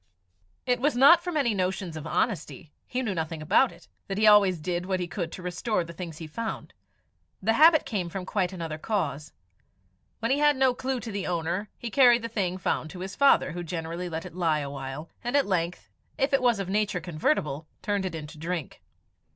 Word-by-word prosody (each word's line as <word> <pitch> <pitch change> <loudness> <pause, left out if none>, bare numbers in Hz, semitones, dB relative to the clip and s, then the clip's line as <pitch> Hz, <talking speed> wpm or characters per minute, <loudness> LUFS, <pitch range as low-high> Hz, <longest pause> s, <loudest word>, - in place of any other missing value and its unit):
It 250 -1 +1
was 290 +1 +1
not 330 +7 +7
from 350 -3 -2
any 250 -6 +2
notions 185 -3 -2
of 155 0 -6
honesty 155 - -2
he 255 +1 -2
knew 215 -5 -1
nothing 160 -1 -3
about 155 - +3
it - - -17 0.2
that 195 - -3
he 215 - +3
always 200 -4 +6
did 175 +2 -3
what 190 -1 0
he 180 - -2
could 175 -2 -4
to 185 - -8
restore 180 +2 -1
the 170 0 -9
things 165 -2 -7
he 160 - -7
found; 220 +9 -5 0.7
the 220 +4 +1
habit 315 +4 +6
came 190 -7 -2
from 185 +1 -5
quite 185 -2 -1
another 165 -4 -5
cause. 155 -8 -2 0.9
When 230 +2 -1
he 280 - +2
had 295 0 +4
no 260 -1 +4
clue 260 +1 -2
to 225 - -6
the 200 -1 -3
owner, 175 +4 -2
he 235 - -6
carried 245 -3 +6
the 230 - -3
thing 185 -5 -1
found 165 -3 -1
to 180 +1 -9
his 190 +1 -6
father, 280 -8 +4
who 175 +2 -5
generally 170 +1 -4
let 160 0 -4
it - - -9
lie 165 -4 +1
a 140 -1 -5
while, 135 +3 -6 0.2
and 245 +4 +1
at 280 - +3
length, 180 -2 -2 0.3
if 275 +1 0
it 275 - +4
was 240 -3 +3
of 195 - -3
nature 205 -1 0
convertible, 155 - -1 0.2
turned 205 -2 0
it 170 - -6
into 155 0 -8
drink. 165 -1 -4
185 Hz, 215 wpm, -27 LUFS, 165-230 Hz, 0.9 s, not